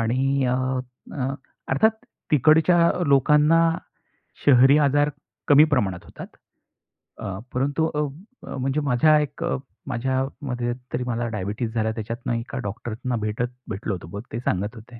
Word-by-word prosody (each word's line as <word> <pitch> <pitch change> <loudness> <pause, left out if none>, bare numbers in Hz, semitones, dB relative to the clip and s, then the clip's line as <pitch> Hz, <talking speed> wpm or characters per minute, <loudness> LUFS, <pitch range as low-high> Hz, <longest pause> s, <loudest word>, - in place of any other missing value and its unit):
आणि 130 +4 +1
अ, 125 - +1 0.6
अ, 135 -1 -2 0.3
अर्थात 180 +12 +4 0.4
तिकडच्या 160 +4 +5 0.2
लोकांना 150 +4 +4 0.9
शहरी 135 +1 +7
आजार 145 0 +3 0.4
कमी 145 +1 +8
प्रमाणात 95 -9 0
होतात. - - -10 0.9
अ, 95 -4 -5 0.2
परंतु 140 +5 0
अ, - - 0 0.5
अ, - - -6
म्हणजे 135 +3 0
माझ्या 145 +3 +4
एक 145 -1 -5
अ, - - 0 0.3
माझ्यामध्ये 130 -1 -2 0.2
तरी 125 - -1
मला 120 0 -1
डायबिटीझ 105 +4 -3
झाला. 110 -1 0
त्याच्यातनं 115 +2 -4
एका 115 +3 -4
डॉक्टर 110 +3 -5
ना 125 -1 0
भेटत 105 +3 -1 0.2
भेटलो 105 0 -3
होतो. 90 -3 -7
मग - - -4
ते 115 - -2
सांगत 105 -1 -2
होते 115 +1 -12
125 Hz, 140 wpm, -24 LUFS, 115-145 Hz, 0.9 s, कमी